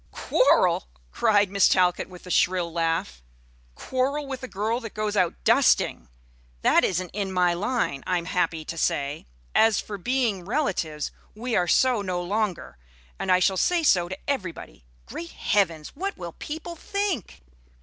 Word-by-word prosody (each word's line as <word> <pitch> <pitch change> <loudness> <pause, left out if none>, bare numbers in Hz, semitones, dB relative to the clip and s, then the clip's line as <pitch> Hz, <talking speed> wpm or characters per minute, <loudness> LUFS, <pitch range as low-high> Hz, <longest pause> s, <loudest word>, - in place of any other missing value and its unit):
"Quarrel!" - - +2 0.2
cried 205 -4 +3
Miss 200 -1 +5
Talcott 180 0 +2
with 180 -1 -13
a 180 - -7
shrill 175 -2 +2
laugh, 165 - -1 0.5
"quarrel 275 +3 -1
with 265 -2 -6
a 255 - -5
girl 220 +2 -1
that 225 -4 -9
goes 215 -1 -2
out 180 -4 +2
dusting! - - +3 0.5
That - - +5
isn't 185 0 -1
in 195 -1 -2
my 180 -1 +2
line, 185 - -1
I 180 - +2
am 170 - -4
happy 170 -3 -1
to 165 - -6
say. 140 - -1 0.3
As 225 -1 +4
for 205 -2 -6
being 235 -3 0
relatives, 175 - -2 0.2
we 235 +2 -3
are 175 - +2
so 250 +3 +3
no 185 -3 -2
longer, 180 - -2 0.4
and - - -1
I 180 - +6
shall 190 +1 +2
say 345 - +2
so 175 - +3
to 190 - -5
everybody. 170 - -4 0.2
Great 170 - -8
Heavens! 170 -7 0
what 390 +6 -4
will - - -7
people 320 +2 -6
think?" 370 - -3
190 Hz, 160 wpm, -25 LUFS, 175-240 Hz, 0.5 s, I